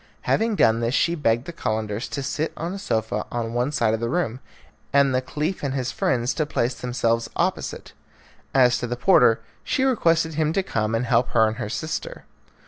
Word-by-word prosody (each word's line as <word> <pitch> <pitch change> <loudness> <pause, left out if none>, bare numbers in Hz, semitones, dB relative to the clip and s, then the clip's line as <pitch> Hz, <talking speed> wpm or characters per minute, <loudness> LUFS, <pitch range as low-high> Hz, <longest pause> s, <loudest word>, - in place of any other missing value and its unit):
Having 225 -1 +1
done 115 - +4
this 120 +3 0
she 170 - +2
begged 120 -6 +1
the 170 - -7
Calenders 110 -5 -2
to 140 - -4
sit 155 +3 -2
on 170 +3 -3
a 200 - -5
sofa 110 - -1
on 115 -1 -3
one 125 +4 0
side 115 -6 +1
of 110 - -1
the 115 0 -2
room, 130 -6 -1 0.5
and 140 -1 +4
the 130 - +2
Caliph 150 +7 -3
and 140 -2 -2
his 130 -2 -2
friends 125 0 0
to 155 - -1
place 125 -4 0
themselves 115 -2 -1
opposite. - - -2 0.6
As 125 -2 +4
to 120 - -3
the 120 +1 -3
porter, 125 -7 +5 0.2
she 265 - 0
requested 165 -11 +2
him 155 0 0
to 195 - +1
come 110 -7 -1
and 115 +2 0
help 120 +1 +2
her 110 -2 +5
and 110 +1 -2
her 110 -4 -4
sister. 160 - -4
125 Hz, 205 wpm, -23 LUFS, 115-155 Hz, 0.6 s, porter